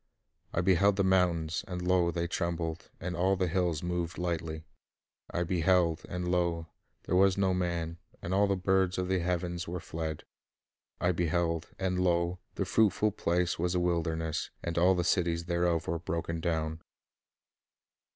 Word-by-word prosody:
I 85 - 0
beheld 95 +2 +4
the 100 - +2
mountains, 90 -4 +2
and, 90 -1 -4
lo, 90 -1 +2
they 85 0 -1
trembled, 85 -1 -3
and 90 +1 -4
all 95 +3 +2
the 95 -1 0
hills 85 -2 0
moved 85 -1 -2
lightly. 80 -2 -3 0.7
I 85 - -1
beheld, 85 -1 +2
and, 90 0 -3
lo, 85 -2 +1 0.4
there - - -1
was 95 +1 +5
no 95 -1 +2
man, 85 -2 -2 0.2
and 85 - -4
all 100 +1 +4
the 100 - +2
birds 95 0 +1
of 90 0 -1
the 95 -1 +2
heavens 85 0 -2
were 90 +2 -3
fled. 80 -2 -5 0.8
I 90 - +2
beheld, 85 -1 0
and, 95 -1 -1
lo, 85 0 +1 0.2
the - - -1
fruitful 110 -1 +3
place 90 -3 0
was 90 +1 0
a - - +3
wilderness, 80 -2 -1
and 85 -1 -3
all 90 +2 +4
the 90 - 0
cities 85 -2 +1
thereof 85 -1 +1
were 85 0 -1
broken 85 0 -3
down." 80 -1 -1
85 Hz, 160 wpm, -30 LUFS, 85-90 Hz, 0.8 s, was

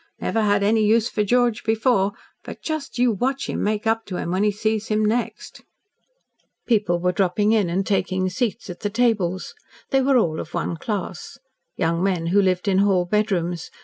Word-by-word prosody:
Never 225 - 0
had 205 -1 +2
any 215 +2 +3
use 225 +2 +3
for 210 - 0
George 240 +1 +1
before, 220 -3 +1 0.3
but - - -10
just 310 -5 -4
you 245 0 +3
watch 260 +6 -1
him - - -3
make 210 +1 -1
up 225 0 +1
to 185 - -4
him 170 - -3
when 185 +2 +1
he 210 - +3
sees 215 +1 -1
him 215 0 +1
next." 230 +3 -3 1.0
People 205 -7 +1
were 180 +1 +1
dropping 195 +3 +1
in 210 -6 +2
and 190 +3 -1
taking 185 -2 0
seats 215 +4 -2
at 180 -2 -8
the 205 - -2
tables. 205 -6 0 0.4
They 270 - +3
were 265 0 +3
all 160 -9 +1
of 165 - -7
one 170 0 -2
class. 205 +4 -5 0.4
Young 170 -1 0
men 185 -3 0
who 205 - +5
lived 185 0 0
in 190 -1 +3
hall 195 -3 +3
bedrooms. 175 -4 -1
205 Hz, 190 wpm, -22 LUFS, 185-225 Hz, 1.0 s, who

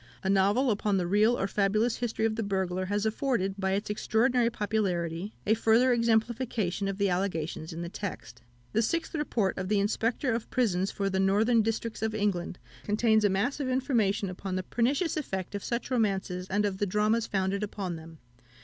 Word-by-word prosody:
A 190 - +1
novel 205 +7 +3
upon 205 -1 +1
the 180 - 0
real 210 +6 +3
or - - 0
fabulous 215 +4 +1
history 225 -2 -1
of 220 -1 0
the 225 - -2
burglar 190 -2 -1
has 205 +2 -1
afforded, 220 -3 0
by 190 0 0
its 200 +2 -1
extraordinary 230 +3 +2
popularity, 200 -5 -2
a 215 - +4
further 230 +3 +4
exemplification 225 -4 0
of 195 -1 -3
the 200 0 +2
allegations 175 -4 -2
in 165 +1 -5
the - - -4
text. 125 - -7 0.3
The 225 - +3
Sixth 335 +9 -1
Report 240 - 0
of 185 0 -3
the 210 -1 +3
Inspector 230 +5 0
of 230 0 -3
Prisons 195 -6 +1
for 200 - -2
the 190 -1 0
Northern 215 +5 +3
Districts 225 0 -2
of 220 -1 -1
England 195 -4 -1 0.3
contains 220 +1 +2
a 205 - +4
mass 205 +10 0
of 270 -3 -1
information 235 -7 +1
upon 185 +1 -5
the 185 - -2
pernicious 275 - 0
effect 190 - -4
of 205 - -4
such 235 +2 -3
romances, 195 -6 0
and 205 +2 +1
of 195 -2 -2
the 205 - +1
dramas 215 +4 +1
founded 195 0 -1
upon 195 -4 -3
them. 160 0 -11
205 Hz, 190 wpm, -29 LUFS, 190-230 Hz, 0.3 s, a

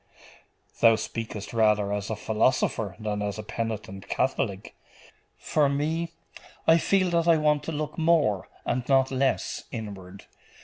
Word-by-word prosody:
'Thou 115 -1 +6
speakest 110 -2 -5
rather 105 -3 +2
as 105 +1 -3
a 110 - -1
philosopher 110 -3 0
than 105 -1 -2
as 105 0 -3
a 110 - -5
penitent 105 -3 -5
Catholic. 115 -7 -1 0.6
For 150 -2 +1
me, 160 +4 -1 0.6
I 165 +1 +6
feel 185 0 +2
that 170 0 +1
I 165 -1 +6
want 150 -1 +2
to - - -3
look 150 +1 -4
more, 155 - +2 0.2
and 125 - 0
not 135 -1 +4
less, 135 0 0
inward. 100 -5 -8
115 Hz, 140 wpm, -26 LUFS, 105-150 Hz, 0.6 s, Thou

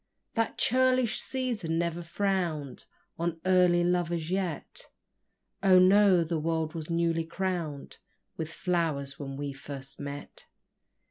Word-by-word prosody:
That 225 0 -1
churlish 255 -1 +2
season 235 -11 -2
never 170 0 -1
frown'd 170 -6 -2 0.3
On 170 -1 -1
early 180 -2 +4
lovers 175 -2 0
yet: 185 -5 -3 0.7
Oh, 190 -1 +6
no 185 -1 +6
the 165 0 -2
world 160 0 -1
was 160 -2 -6
newly 165 -1 +1
crown'd 170 -4 -4 0.4
With 160 -1 -4
flowers 160 -7 -1
when 140 0 -5
first 135 0 -8
we 145 - -5
met! 145 0 -8
170 Hz, 120 wpm, -29 LUFS, 155-185 Hz, 0.7 s, Oh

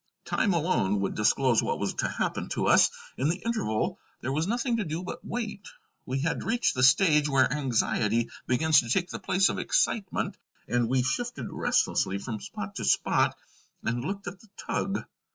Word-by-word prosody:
Time 205 - +1
alone 150 - +1
would 95 - -1
disclose 120 +2 +3
what - - -1
was - - -2
to - - -1
happen - - -2
to - - -1
us; - - +6 0.3
in 135 +4 +1
the 175 +3 -1
interval 110 - -1 0.2
there 130 - -2
was 155 +5 0
nothing 240 +2 0
to 225 - 0
do 165 0 -4
but 185 - -7
wait. 215 -4 -5 0.4
We 135 +1 -1
had 165 +2 -1
reached 235 +2 +1
the 130 - -2
stage 150 +2 +5
where 135 -2 +3
anxiety 115 -4 0 0.2
begins 155 +4 +4
to 120 - -3
take 175 +6 0
the - - -5
place 190 +1 +2
of - - -3
excitement, 230 - 0 0.3
and 120 -1 +1
we 130 0 +2
shifted 240 - -3
restlessly 95 - +1
from 110 +2 -5
spot - - -7
to - - -4
spot - - +2 0.5
and 120 +1 -1
looked 195 +6 -4
at 180 +2 -7
the 220 - -20
tug. 195 0 -2
150 Hz, 185 wpm, -28 LUFS, 120-195 Hz, 0.5 s, us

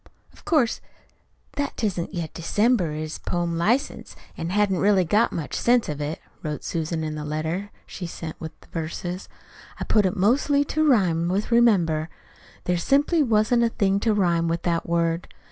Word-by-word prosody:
"Of - - -20
course 300 - +2 0.8
that 285 0 -2
''tisn't 190 -6 -1
yet 170 -4 -4
December' 195 0 +1
is 155 +1 -5
poem 175 -1 -2
license, 235 - 0 0.2
and 165 +1 -4
hain't 205 0 +2
really 190 0 +3
got 210 +7 +3
much 160 -4 -5
sense 240 -1 +3
to 150 -1 -4
it," 150 +2 -4 0.2
wrote 150 -2 -4
Susan 160 0 -2
in 155 -1 -3
the 150 0 -5
letter 160 +6 -3 0.2
she 180 - -7
sent 165 -1 -7
with 160 -1 -8
the - - -19
verses. 175 +3 -5 0.5
"I - - -2
put 210 -3 +3
it 185 - -2
in - - -5
mostly 280 +8 +3
to 310 +2 0
rhyme 180 - +3
with 200 +5 -1
'remember.' 175 -10 +3 0.5
(There 180 0 0
simply 290 - +2
wasn't 230 -1 +3
a 235 - +3
thing 200 -3 +1
to 220 +2 +1
rhyme 170 -4 +2
with 165 0 -1
that 170 -1 -1
word!) 170 0 0
180 Hz, 180 wpm, -24 LUFS, 165-220 Hz, 0.8 s, really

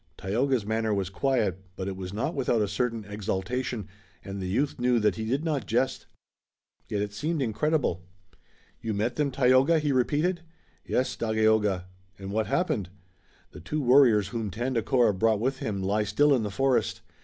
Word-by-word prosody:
Tayoga's 120 +3 0
manner 110 +1 0
was 95 -1 -2
quiet, 130 -3 0 0.2
but 95 - -4
it 95 - -3
was 95 -1 -6
not 115 - -2
without 125 -5 +1
a 105 - +1
certain 115 -1 -2
exultation, 105 +2 -3 0.4
and 100 0 -5
the 95 - -3
youth 135 +10 -1
knew 125 -1 +3
that 105 -2 +2
he 110 - -4
did 135 +8 -1
not 145 - -1
jest. - - 0 0.8
Yet 105 -1 -1
it 105 0 -5
seemed 155 +10 -2
incredible. 135 - 0 0.8
"You 110 -2 -2
met 115 +4 -1
them, 150 -2 +1
Tayoga?" 130 +4 +4
he 150 -2 0
repeated. 150 +7 +1 0.4
"Yes, 130 - -1
Dagaeoga." 110 -4 +1 0.3
"And 95 0 -7
what 110 0 0
happened?" 110 - 0 0.6
"The - - -11
two 155 - -3
warriors 120 -7 +5
whom 115 -3 -3
Tandakora 120 +1 +1
brought 110 +2 +2
with 130 +4 -1
him 100 -3 -3
lie 105 +3 +1
still 145 +6 +3
in 130 - +2
the 105 - -2
forest. 130 +6 0
115 Hz, 170 wpm, -27 LUFS, 105-135 Hz, 0.8 s, warriors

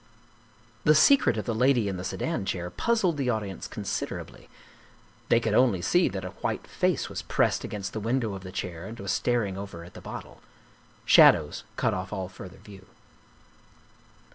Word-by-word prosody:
The 155 - +5
secret 155 - +5
of 105 - -3
the 115 - -1
Lady 125 -1 +3
in 95 -2 -3
the 90 - -6
Sedan 160 - -2
Chair 90 -2 -3
puzzled 190 - +1
the 135 -3 0
audience 105 -5 -3
considerably - - -5 0.8
they 115 - +5
could 110 -2 -1
only 115 -5 +4
see 180 0 +3
that 95 -2 -5
a - - -4
white - - -2
face - - 0
was - - -5
pressed - - +1
against 100 -2 -5
the 110 - -3
window 115 0 -1
of 95 - -7
the 95 -1 -9
chair 90 -2 -5
and 115 +2 -9
was 100 -1 -3
star 120 -3 +1
ing 95 -1 -5
over 100 -4 -8
at 85 - -13
the - - -11
bottle. - - -9 0.6
Shadows - - +6
cut - - +1
off 95 0 -4
all 95 -3 -4
further 95 0 -11
view. 95 -2 -14
105 Hz, 180 wpm, -27 LUFS, 95-125 Hz, 0.8 s, Shadows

